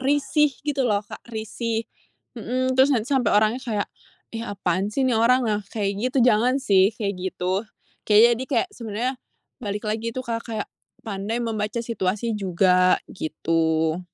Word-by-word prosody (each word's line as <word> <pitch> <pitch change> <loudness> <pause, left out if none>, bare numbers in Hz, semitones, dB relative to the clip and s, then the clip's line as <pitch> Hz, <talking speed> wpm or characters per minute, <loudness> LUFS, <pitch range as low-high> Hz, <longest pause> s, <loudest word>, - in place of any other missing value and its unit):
risih 290 +2 +2 0.2
gitu 285 -2 -1
loh 205 0 +1
Kak, - - -10
risih, 225 0 -3 0.5
mhm, 255 +2 -1
terus 260 +2 +5
nanti 255 0 0
sampai 245 -6 +3
orangnya 215 +4 +2
kayak, 215 -5 -2 0.5
ih, 225 - -4
apaan 190 -1 -1
sih 265 +5 0
ini 255 - +2
orang 240 +3 +4
nah 210 -2 0
kayak 205 -3 -1 0.2
gitu 255 -2 +2
jangan 245 +3 +4
sih 195 -7 +4
kayak 200 -4 -3
gitu, 190 +3 -2 0.4
kayak 225 +3 +7
jadi 245 +3 -2
kayak 245 -6 +1
sebenarnya, 230 +2 -3 0.5
balik 210 0 -4
lagi 220 +2 -2
itu 255 - -3
Kak, 230 -1 -2
kayak 215 -2 -3 0.4
pandai 205 +1 -3
membaca 225 -1 -2
situasi 220 0 -1
juga 185 -2 +3 0.2
gitu. 160 0 0
220 Hz, 155 wpm, -24 LUFS, 200-245 Hz, 0.5 s, kayak